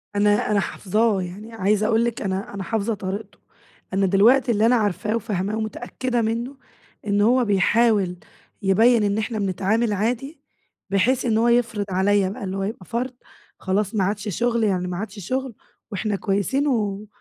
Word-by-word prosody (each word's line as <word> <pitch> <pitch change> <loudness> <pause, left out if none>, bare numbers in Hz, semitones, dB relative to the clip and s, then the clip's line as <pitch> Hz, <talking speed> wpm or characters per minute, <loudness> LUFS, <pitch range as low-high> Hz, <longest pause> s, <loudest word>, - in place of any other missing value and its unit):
أنا 205 +1 +2
أنا 205 - +3
حافظاه. 210 +1 0
يعني 200 +6 -8
عايزة 215 0 +1
أقول 230 0 +2
لِك، 235 -1 -3
أنا 195 +3 -3
أنا 200 -1 -4
حافظة 225 +1 -1
طريقته. 200 +1 -6 0.5
أنا 195 0 +2
دلوقتي 230 +7 +4
اللي 215 0 +2
أنا 245 +2 +5
عارفاه 210 0 0
وفاهماه 205 -1 -2
ومتأكدة 245 +3 -2
منّه، 230 +4 -2 0.5
إن 205 0 +2
هو 245 +4 +4
بيحاول 205 -1 +2 0.5
يبيّن 220 +4 +4
إن 205 0 +1
احنا 220 0 -2
بنتعامل 200 +4 0
عادي، 250 - -2 0.5
بحيث 245 +7 +2
إن 220 -2 +2
هو 230 - +3
يفرض 235 -3 +1
عليّا 190 +1 +2
بقى 200 - -7
اللي 190 0 -3
هو 195 - -2
يبقى 195 -2 -5
فرض، 245 +6 -3 0.5
خلاص 200 +2 -1
ما 195 - +2
عادش 205 +2 -2
شغل 235 -1 +1
يعني 185 -4 0
ما 180 -1 -4
عادش 210 +1 -6
شغل، 255 +6 -3 0.4
إاحنا 205 +1 -1
كويسين، 205 +9 0
و 210 -5 -1
210 Hz, 165 wpm, -23 LUFS, 195-230 Hz, 0.5 s, أنا